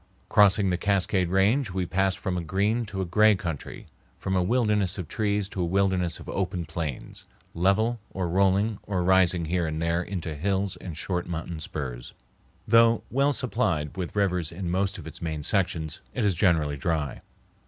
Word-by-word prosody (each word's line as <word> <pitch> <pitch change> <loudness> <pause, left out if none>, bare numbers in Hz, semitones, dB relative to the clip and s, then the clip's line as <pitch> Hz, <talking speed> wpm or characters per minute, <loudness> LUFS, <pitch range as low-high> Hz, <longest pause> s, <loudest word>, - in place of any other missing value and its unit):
Crossing 100 -1 +5
the 90 - -1
Cascade 95 -2 +1
Range, 105 +7 +2
we 90 0 -2
pass 95 +3 +1
from 95 -3 -3
a 90 - -1
green 105 +7 0
to 95 -1 -4
a - - -3
gray 105 +4 +4
country, 85 -6 -6 0.3
from 95 - -2
a 90 - +3
wilderness 105 -2 +1
of 90 -5 -5
trees 105 0 0
to 95 - -4
a - - +1
wilderness 95 -1 +1
of - - -11
open 90 -3 -2
plains, 80 -4 -6 0.3
level 105 +7 +2
or 95 -2 -3
rolling 100 +4 +2
or 95 -3 0
rising 90 -2 +3
here 85 +1 0
and 80 0 -3
there 85 +1 +1
into 90 -3 -4
hills 95 +5 -1
and 85 -5 -8
short 90 0 -2
mountain 85 -1 -4
spurs. 65 -6 -6 0.5
Though 115 0 +5
well 140 +4 +3
supplied 100 - -1
with 90 0 -5
rivers 90 -5 0
in 85 0 -4
most 95 +2 0
of - - -9
its - - -9
main 80 -3 -3
sections, 80 -4 0
it 120 - 0
is 100 - +3
generally 80 -5 +2
dry. 75 -1 -2
95 Hz, 180 wpm, -26 LUFS, 85-100 Hz, 0.5 s, Crossing